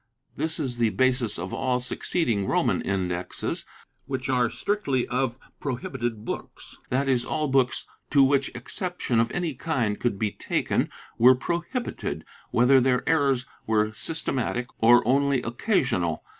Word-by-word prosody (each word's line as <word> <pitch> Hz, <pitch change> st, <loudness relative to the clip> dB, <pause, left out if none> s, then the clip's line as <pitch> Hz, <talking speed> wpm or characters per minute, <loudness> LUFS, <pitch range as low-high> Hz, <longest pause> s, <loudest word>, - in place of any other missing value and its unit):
This 160 Hz, +1 st, -3 dB
is 125 Hz, -5 st, -3 dB
the 115 Hz, -2 st, +4 dB
basis 125 Hz, -3 st, +1 dB
of 90 Hz, +2 st, -5 dB
all 130 Hz, -2 st, 0 dB
succeeding 120 Hz, -, 0 dB
Roman -, -, +2 dB
Indexes, 90 Hz, -2 st, -2 dB, 0.4 s
which 130 Hz, -1 st, -3 dB
are 125 Hz, -2 st, +3 dB
strictly 130 Hz, -, -1 dB
of 125 Hz, -1 st, 0 dB, 0.2 s
pro 130 Hz, -4 st, -2 dB
hibited 120 Hz, -4 st, -4 dB
books -, -, -7 dB
— -, -, -33 dB
that 135 Hz, +2 st, +1 dB
is, 125 Hz, -3 st, +2 dB
all 155 Hz, +3 st, -1 dB
books, 130 Hz, -2 st, +1 dB, 0.2 s
to 140 Hz, -2 st, +5 dB
which 135 Hz, 0 st, +3 dB
exception 175 Hz, -10 st, -2 dB
of 115 Hz, +1 st, +2 dB
any 175 Hz, -3 st, -1 dB
kind 125 Hz, -7 st, -1 dB
could 120 Hz, -5 st, 0 dB
be 105 Hz, 0 st, 0 dB
taken, -, -, -1 dB, 0.3 s
were 125 Hz, +3 st, +8 dB
prohibited, 175 Hz, -, -3 dB, 0.2 s
whether 130 Hz, +3 st, +5 dB
their 125 Hz, 0 st, +1 dB
errors 140 Hz, -6 st, +2 dB, 0.2 s
were 110 Hz, -1 st, +2 dB
syste 160 Hz, +9 st, -3 dB
matic 125 Hz, -1 st, -1 dB
or 120 Hz, +1 st, +6 dB
only 140 Hz, 0 st, +3 dB
occasional. 120 Hz, -, 0 dB
125 Hz, 150 wpm, -26 LUFS, 115-140 Hz, 0.4 s, were